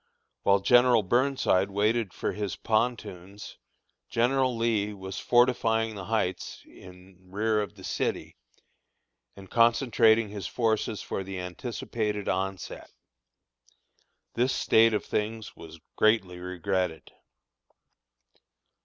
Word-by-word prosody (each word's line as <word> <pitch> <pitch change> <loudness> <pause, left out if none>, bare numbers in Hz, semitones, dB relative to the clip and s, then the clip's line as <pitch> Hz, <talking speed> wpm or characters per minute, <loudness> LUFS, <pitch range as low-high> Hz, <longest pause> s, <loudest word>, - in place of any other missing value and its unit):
While 100 0 +3
General 120 +1 +5
Burnside 120 -4 +1
waited 105 +1 0
for - - -3
his 105 -2 -4
pontoons, 105 -4 -3 0.5
General 125 +1 +1
Lee 110 -3 0
was 95 -1 -7
fortifying 115 -2 +2
the 100 -3 -7
Heights 110 -4 -2
in 90 0 -16
rear 105 +2 0
of 100 -4 -6
the - - -14
city, - - -3 1.0
and 95 -1 -12
concentrating 115 -1 +3
his 100 -5 -6
forces 110 -1 -1
for 95 - -4
the 95 0 -6
anticipated 105 +2 -4
onset. 95 -1 -3 1.4
This 125 +3 +1
state 115 0 +4
of - - -2
things 110 0 -3
was 80 0 -12 0.2
greatly 105 -5 +2
regretted. 90 -4 -3
105 Hz, 105 wpm, -27 LUFS, 95-115 Hz, 1.4 s, General